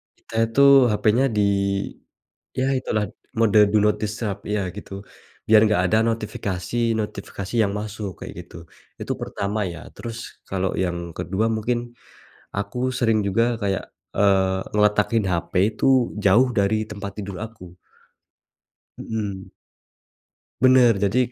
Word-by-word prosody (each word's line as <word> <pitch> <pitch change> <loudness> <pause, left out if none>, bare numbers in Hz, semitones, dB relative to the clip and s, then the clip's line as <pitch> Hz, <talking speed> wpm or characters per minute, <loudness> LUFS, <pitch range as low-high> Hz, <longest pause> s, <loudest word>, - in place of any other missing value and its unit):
kita - - -18
itu 125 +5 +1 0.3
HP-nya 110 +5 +2
di - - +4 1.1
yah 130 +1 0
itulah 110 -4 -1
d - - -16 0.3
mode 110 -2 +4
do 105 - +5
not 105 - +3
disturb 105 -1 -2
iya, 105 -1 0 0.2
gitu, 100 - -9 0.6
biar 110 -1 +7
enggak 105 -4 +2
ada 110 - +3
notifikasi-notifikasi 105 -1 -3
yang 100 - -1
masuk, 105 -2 -5
kayak - - -7
gitu. - - -14 0.4
Itu - - -3
pertama 100 +1 -3
ya, 85 - -10
terus 115 -1 -6 0.3
kalau 95 -1 -1
yang 90 -2 -1 0.2
ke-2 105 +5 -1
mungkin 120 +2 0 0.8
aku 100 +4 -3 0.2
sering 115 -3 +2
juga 115 +4 +2 0.2
kayak, 100 -2 -1 0.3
eee, 95 -2 +3 0.2
ngeletakin 105 +1 +2
HP 85 -1 -2 0.2
itu - - -1 0.4
jauh 115 +7 +5
dari 110 +2 +1
tempat 100 -1 -6
tidur 100 -3 -6
aku. 90 -6 -13 1.2
Mhm. 100 -4 -5 1.1
Bener, 130 -2 +6
jadi 100 +6 +1
105 Hz, 125 wpm, -23 LUFS, 100-115 Hz, 1.2 s, biar